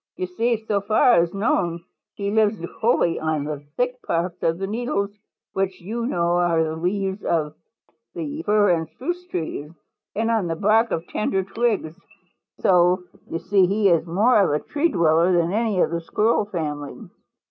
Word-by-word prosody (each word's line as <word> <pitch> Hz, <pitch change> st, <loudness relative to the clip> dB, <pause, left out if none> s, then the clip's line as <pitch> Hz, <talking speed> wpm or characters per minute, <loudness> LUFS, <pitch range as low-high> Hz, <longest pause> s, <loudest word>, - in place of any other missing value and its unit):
You 185 Hz, -, -3 dB
see, 230 Hz, +6 st, 0 dB
so 205 Hz, -2 st, 0 dB
far 215 Hz, +1 st, +4 dB
as 170 Hz, 0 st, -1 dB
known, 175 Hz, -5 st, 0 dB, 0.3 s
he 200 Hz, 0 st, -2 dB
lives 215 Hz, 0 st, +2 dB, 0.2 s
wholly 220 Hz, -7 st, +2 dB
on 155 Hz, -2 st, -1 dB
the 150 Hz, -1 st, -4 dB, 0.2 s
thick 250 Hz, 0 st, -1 dB
parts 170 Hz, +1 st, -2 dB
of 165 Hz, 0 st, +1 dB
the 195 Hz, -, -3 dB
needles, 205 Hz, -1 st, -2 dB, 0.4 s
which 190 Hz, -1 st, -1 dB
you 230 Hz, +6 st, -4 dB
know 175 Hz, -5 st, +1 dB
are 170 Hz, -2 st, +2 dB
the 160 Hz, 0 st, -3 dB
leaves, 190 Hz, +4 st, -2 dB
of 155 Hz, -3 st, 0 dB, 0.6 s
fir 290 Hz, -, +1 dB
and 165 Hz, -2 st, 0 dB
spruce 350 Hz, -, -5 dB
trees, 155 Hz, -, -4 dB, 0.5 s
and 225 Hz, +2 st, 0 dB
on 220 Hz, -6 st, +1 dB
the 165 Hz, -, -2 dB
bark 215 Hz, +5 st, +3 dB
of 165 Hz, -, -2 dB
tender 195 Hz, -1 st, -1 dB
twigs. 195 Hz, -5 st, -1 dB, 0.7 s
So 180 Hz, 0 st, +4 dB, 0.3 s
you -, -, -2 dB
see 190 Hz, +1 st, +3 dB
he 200 Hz, +1 st, +2 dB
is 170 Hz, -1 st, +2 dB
more 210 Hz, +7 st, +4 dB
of 195 Hz, -, +2 dB
a 150 Hz, -, +1 dB
tree 300 Hz, +3 st, +1 dB
dweller 170 Hz, -, +3 dB
than 170 Hz, +1 st, +2 dB
any 220 Hz, -3 st, 0 dB
of -, -, +2 dB
the 170 Hz, 0 st, -2 dB
Squirrel 215 Hz, +5 st, +1 dB
family. 150 Hz, -7 st, -5 dB
190 Hz, 170 wpm, -23 LUFS, 170-220 Hz, 0.7 s, far